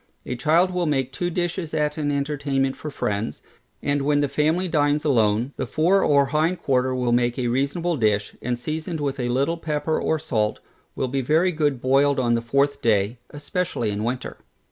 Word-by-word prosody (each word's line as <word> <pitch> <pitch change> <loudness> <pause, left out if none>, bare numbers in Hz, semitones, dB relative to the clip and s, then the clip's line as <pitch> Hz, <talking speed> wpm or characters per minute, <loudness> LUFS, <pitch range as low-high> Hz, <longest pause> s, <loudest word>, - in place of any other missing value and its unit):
A 125 - -3
child 165 +8 +3
will 180 -2 -1
make 135 -3 0
two 175 +6 -2
dishes 175 -2 -2
at 150 -1 0
an 150 -2 -1
entertainment 140 -2 -1
for 155 - -6
friends, 105 -5 -3 0.4
and 145 0 +1
when 145 +1 +2
the 145 - +2
family 160 +6 +1
dines 150 -2 +1
alone, 115 -1 +2
the - - -3
fore 180 +5 +3
or 140 -1 +4
hind 155 +5 0
quarter 130 -1 +1
will 125 -1 0
make 120 0 +1
a 125 -2 0
reasonable 140 +7 0
dish, 105 -3 0
and 125 0 -2
seasoned 160 +5 -4
with 140 -2 -2
a 120 -1 -1
little 140 +7 +1
pepper 155 -1 -1
or 160 - +1
salt, 110 -7 -1 0.4
will 130 - -1
be 135 +2 -1
very 160 +8 +2
good 150 -5 0
boiled 135 +2 +3
on 120 -2 +2
the 115 - +1
fourth 140 +4 +1
day, 110 +1 +1
especially 150 - -2
in 105 +1 -3
winter. 125 +2 -3
140 Hz, 190 wpm, -23 LUFS, 125-155 Hz, 0.4 s, or